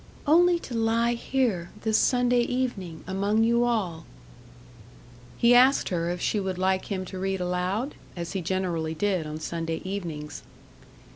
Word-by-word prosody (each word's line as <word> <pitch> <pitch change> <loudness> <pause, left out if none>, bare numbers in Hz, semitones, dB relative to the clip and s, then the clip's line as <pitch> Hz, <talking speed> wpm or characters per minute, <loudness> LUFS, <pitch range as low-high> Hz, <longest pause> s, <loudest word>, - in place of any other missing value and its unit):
"Only 345 +3 +5
to 250 - -8
lie 230 +1 +2
here, 235 -8 -1
this 220 -1 +1
Sunday 245 -1 +3
evening, 235 -10 -3
among 200 +4 +1
you 235 +1 +3
all." 195 -9 -2 1.3
He 235 +1 +5
asked 255 +3 +5
her 170 -2 -1
if 175 0 -3
she 210 - 0
would 190 -2 -3
like 190 0 +1
him 190 -2 -3
to 185 0 -7
read 190 0 -1
aloud? 180 +8 -1 0.2
as 170 -1 -5
he 190 - -2
generally 170 -3 -2
did 185 -2 0
on 155 +1 -5
Sunday 165 0 -3
evenings. 165 -6 -5
190 Hz, 150 wpm, -26 LUFS, 175-235 Hz, 1.3 s, Only